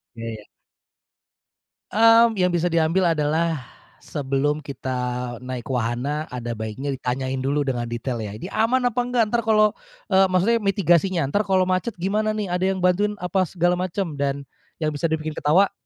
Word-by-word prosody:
Iya 115 Hz, 0 st, -7 dB
iya. 105 Hz, -, -13 dB, 1.5 s
Mmm, 225 Hz, +1 st, +5 dB
yang 180 Hz, 0 st, +3 dB
bisa 175 Hz, +1 st, +1 dB
diambil 170 Hz, +2 st, +2 dB
adalah 160 Hz, +1 st, 0 dB, 0.4 s
sebelum 145 Hz, +1 st, -1 dB
kita 125 Hz, -3 st, -4 dB
naik 125 Hz, -1 st, -6 dB
wahana, 125 Hz, +6 st, -1 dB
ada 120 Hz, -1 st, -4 dB
baiknya 110 Hz, +6 st, -4 dB
ditanyain 130 Hz, +1 st, -2 dB
dulu 140 Hz, +2 st, 0 dB
dengan 120 Hz, -3 st, -2 dB
detail 120 Hz, +1 st, -3 dB
ya, 105 Hz, 0 st, -6 dB
ini 115 Hz, -, -7 dB
aman 245 Hz, +4 st, +2 dB
apa 245 Hz, 0 st, -1 dB
nggak? 245 Hz, -1 st, +2 dB
Entar 240 Hz, -, +2 dB
kalau, 215 Hz, -1 st, +4 dB, 0.4 s
eee, 190 Hz, 0 st, +5 dB
maksudnya 195 Hz, +6 st, +3 dB
mitigasinya, 190 Hz, -2 st, +2 dB
entar 205 Hz, +10 st, +1 dB
kalau 190 Hz, -1 st, +3 dB
macet 185 Hz, +4 st, -1 dB
gimana 210 Hz, +4 st, 0 dB
nih? 210 Hz, -2 st, -2 dB
Ada 180 Hz, +1 st, 0 dB
yang -, -, -5 dB
bantuin 205 Hz, +3 st, +2 dB
apa 180 Hz, +1 st, +1 dB
segala 175 Hz, 0 st, +1 dB
macem? 185 Hz, -3 st, -2 dB
Dan 140 Hz, 0 st, -1 dB, 0.4 s
yang 155 Hz, -2 st, 0 dB
bisa 150 Hz, +3 st, -1 dB
dibikin 155 Hz, -1 st, -2 dB
ketawa, 180 Hz, +7 st, +3 dB
165 Hz, 165 wpm, -23 LUFS, 135-195 Hz, 1.5 s, Mmm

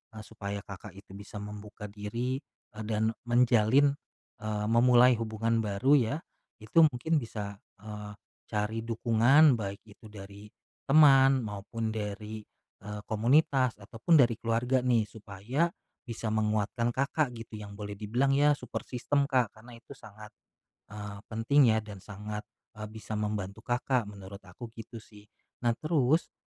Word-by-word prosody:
eee, 110 Hz, -, -8 dB
supaya 100 Hz, -2 st, -6 dB
Kakak 100 Hz, 0 st, -10 dB
itu 100 Hz, -1 st, -15 dB
bisa 100 Hz, +1 st, -12 dB
membuka 105 Hz, 0 st, -8 dB
diri, 115 Hz, +5 st, -3 dB, 0.4 s
eee, 110 Hz, -, -5 dB
dan 110 Hz, 0 st, +1 dB, 0.2 s
menjalin, 120 Hz, +3 st, +4 dB, 0.5 s
eee, 105 Hz, -1 st, -3 dB
memulai 125 Hz, +1 st, +6 dB
hubungan 115 Hz, 0 st, -1 dB
baru 115 Hz, +7 st, +3 dB
ya, 120 Hz, +4 st, 0 dB, 0.5 s
itu 110 Hz, +9 st, +2 dB
mungkin 155 Hz, +4 st, 0 dB
bisa, 105 Hz, -5 st, -6 dB, 0.2 s
eee, 105 Hz, -1 st, -8 dB, 0.3 s
cari 105 Hz, +1 st, -2 dB
dukungan, 120 Hz, +4 st, +4 dB
baik 100 Hz, -1 st, -5 dB
itu 110 Hz, +1 st, -18 dB
dari 100 Hz, 0 st, -11 dB, 0.4 s
teman 135 Hz, -3 st, +6 dB
maupun 110 Hz, +2 st, -4 dB
dari, 105 Hz, 0 st, -5 dB, 0.4 s
eee, 105 Hz, +1 st, -7 dB
komunitas 130 Hz, +3 st, +2 dB
ataupun 115 Hz, -, +1 dB
dari 120 Hz, -6 st, +5 dB
keluarga 120 Hz, +3 st, +1 dB
nih 125 Hz, -3 st, +2 dB
supaya, 110 Hz, -, -2 dB, 0.3 s
bisa 115 Hz, -1 st, -6 dB
menguatkan 110 Hz, +2 st, 0 dB
Kakak 140 Hz, +3 st, 0 dB
gitu 110 Hz, -1 st, -9 dB
yang 100 Hz, -1 st, -9 dB
boleh 105 Hz, 0 st, -6 dB
dibilang 115 Hz, +7 st, 0 dB
ya 145 Hz, +1 st, +4 dB
support -, -, -6 dB
system, 140 Hz, +3 st, 0 dB
Kak, 125 Hz, -5 st, +1 dB
karena 115 Hz, +2 st, -14 dB
itu 125 Hz, +4 st, -13 dB
sangat, 105 Hz, -4 st, -13 dB, 0.6 s
eee, 105 Hz, -1 st, -7 dB
penting 120 Hz, +5 st, +3 dB
ya 110 Hz, -, +3 dB
dan 105 Hz, -3 st, -10 dB
sangat, 105 Hz, +1 st, -6 dB, 0.3 s
eee, 105 Hz, 0 st, -7 dB
bisa 110 Hz, 0 st, -9 dB
membantu 105 Hz, -1 st, -3 dB
Kakak, 125 Hz, -2 st, 0 dB
menurut 100 Hz, -1 st, -10 dB
aku 95 Hz, +6 st, -10 dB
gitu 115 Hz, +1 st, -10 dB
sih. 105 Hz, -1 st, -14 dB, 0.3 s
Nah, 120 Hz, -1 st, +1 dB
terus 155 Hz, 0 st, +1 dB
110 Hz, 145 wpm, -29 LUFS, 105-125 Hz, 0.6 s, memulai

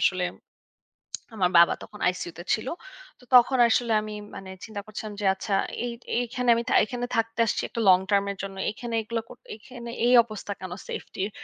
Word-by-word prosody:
আসলে 185 Hz, -1 st, +2 dB, 1.1 s
আমার 185 Hz, -4 st, +2 dB
বাবা 170 Hz, -, +6 dB
তখন 210 Hz, -, -12 dB
আইসিইউতে 175 Hz, -1 st, -3 dB
ছিল। 220 Hz, -, -2 dB, 0.5 s
তো -, -, -20 dB
তখন 250 Hz, +2 st, +6 dB
আসলে 235 Hz, +1 st, +2 dB
আমি 215 Hz, 0 st, -6 dB, 0.2 s
মানে 190 Hz, -, -8 dB, 0.2 s
চিন্তা 215 Hz, -2 st, -6 dB
করছিলাম 215 Hz, 0 st, -7 dB
যে, -, -, -2 dB
আচ্ছা 195 Hz, +1 st, -4 dB, 0.3 s
এই 240 Hz, -, -3 dB, 0.2 s
এই -, -, +3 dB
এখানে 250 Hz, 0 st, -2 dB
আমি 235 Hz, -, -1 dB
থা -, -, +1 dB
এখানে 245 Hz, +2 st, -4 dB
থাকতে 230 Hz, 0 st, -1 dB
আসছি -, -, 0 dB
একটু -, -, -5 dB
long 185 Hz, 0 st, +7 dB
term 200 Hz, -1 st, +4 dB
এর 200 Hz, -, -8 dB
জন্য। 195 Hz, -1 st, -6 dB
এখানে 235 Hz, +2 st, -7 dB
এগুলো 230 Hz, +1 st, -3 dB
কর -, -, -12 dB, 0.2 s
এখানে 235 Hz, +2 st, -10 dB, 0.2 s
এই 245 Hz, -, +4 dB
অবস্থা 215 Hz, -2 st, -7 dB
কেন 185 Hz, -1 st, -6 dB, 0.2 s
সেফটির? 195 Hz, +1 st, -4 dB
215 Hz, 190 wpm, -26 LUFS, 195-235 Hz, 1.1 s, long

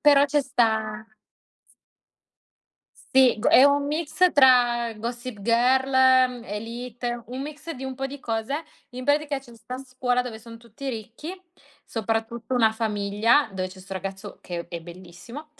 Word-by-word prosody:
però 285 Hz, -1 st, +6 dB
ce 290 Hz, +1 st, +1 dB
sta 220 Hz, -4 st, 0 dB, 1.9 s
Sì, 260 Hz, -4 st, +3 dB
go 215 Hz, -, +2 dB
è 260 Hz, -, +7 dB
un 285 Hz, 0 st, +3 dB
mix 315 Hz, +4 st, +1 dB
tra 245 Hz, -4 st, +5 dB
"Gossip 235 Hz, 0 st, -6 dB
Girl", 255 Hz, +4 st, +3 dB, 0.4 s
mhmm, 245 Hz, -2 st, -9 dB
"Élite", 235 Hz, +2 st, -5 dB
un 255 Hz, +2 st, -6 dB
mix 300 Hz, +2 st, -8 dB
di 265 Hz, -2 st, -8 dB
un 265 Hz, -, -4 dB
po' 270 Hz, +1 st, -3 dB
di 280 Hz, +1 st, -8 dB
cose. 225 Hz, +4 st, -2 dB, 0.4 s
In 250 Hz, +1 st, -7 dB
pratica 290 Hz, 0 st, +1 dB
c'è 245 Hz, -3 st, -16 dB
'sta 250 Hz, +3 st, -8 dB
scuola 255 Hz, -1 st, -1 dB
dove 240 Hz, -3 st, -7 dB
son 230 Hz, +1 st, -12 dB
tutti 235 Hz, +4 st, -8 dB
ricchi, 230 Hz, -, -6 dB, 0.5 s
soprattutto 225 Hz, +3 st, -3 dB
1 225 Hz, -3 st, +4 dB
famiglia, 220 Hz, +4 st, +2 dB
dove 185 Hz, -1 st, -3 dB
c'è 185 Hz, 0 st, -13 dB
'sto 195 Hz, +1 st, -11 dB
ragazzo 195 Hz, +2 st, -6 dB
che 170 Hz, -1 st, -6 dB
è 170 Hz, -1 st, -6 dB
bellissimo. 180 Hz, -, -11 dB
240 Hz, 150 wpm, -25 LUFS, 220-265 Hz, 1.9 s, è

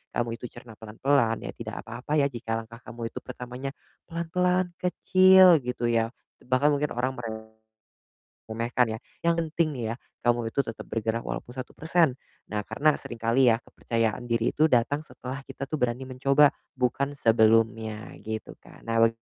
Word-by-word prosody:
kamu 115 Hz, -1 st, -1 dB
itu 125 Hz, -, -6 dB
cerna 115 Hz, -3 st, -13 dB
pelan-pelan 115 Hz, +1 st, +1 dB
ya -, -, -4 dB
tidak -, -, -7 dB
apa-apa 125 Hz, +6 st, -4 dB
ya, 140 Hz, -2 st, +4 dB
jika 115 Hz, -2 st, -3 dB
langkah 115 Hz, +1 st, -7 dB
kamu 115 Hz, -1 st, -7 dB
itu -, -, -6 dB
pertamanya, 125 Hz, +2 st, -7 dB, 0.3 s
pelan-pelan, 180 Hz, +2 st, 0 dB
kecil 185 Hz, -1 st, +6 dB
gitu 120 Hz, -2 st, -2 dB
ya, 115 Hz, -1 st, +2 dB, 0.3 s
te -, -, -22 dB
bahkan 140 Hz, +4 st, +3 dB
mungkin 145 Hz, +1 st, +1 dB
orang 130 Hz, +2 st, 0 dB, 1.1 s
meremehkan 115 Hz, +2 st, -1 dB
ya, 110 Hz, -, -5 dB, 0.3 s
yang 170 Hz, -, +5 dB
penting 160 Hz, -1 st, 0 dB
nih 120 Hz, -4 st, -4 dB
ya, -, -, -7 dB, 0.3 s
kamu 120 Hz, -2 st, +1 dB
itu 140 Hz, -, +3 dB
tetap 115 Hz, -4 st, -7 dB
bergerak 115 Hz, +1 st, -2 dB
walaupun -, -, -5 dB
1%. 160 Hz, +3 st, +1 dB, 0.4 s
Nah, 105 Hz, -, 0 dB
karena 140 Hz, +9 st, +2 dB
sering 120 Hz, -, -7 dB
kali 115 Hz, +3 st, +4 dB
ya 115 Hz, -, +4 dB
kepercayaan 115 Hz, +1 st, -2 dB
diri 115 Hz, 0 st, +1 dB
itu 155 Hz, +1 st, +3 dB
datang 130 Hz, +5 st, +2 dB
setelah 135 Hz, -2 st, -8 dB
kita 135 Hz, 0 st, -7 dB
tuh 150 Hz, 0 st, -4 dB
berani 125 Hz, +2 st, 0 dB
mencoba, 135 Hz, +3 st, +4 dB, 0.2 s
bukan 130 Hz, +2 st, +1 dB
sebelumnya 110 Hz, -2 st, +2 dB
gitu 110 Hz, -1 st, -5 dB
kan, -, -, -17 dB
nah 115 Hz, 0 st, +1 dB
wek 115 Hz, 0 st, +4 dB
125 Hz, 165 wpm, -27 LUFS, 115-145 Hz, 1.1 s, kecil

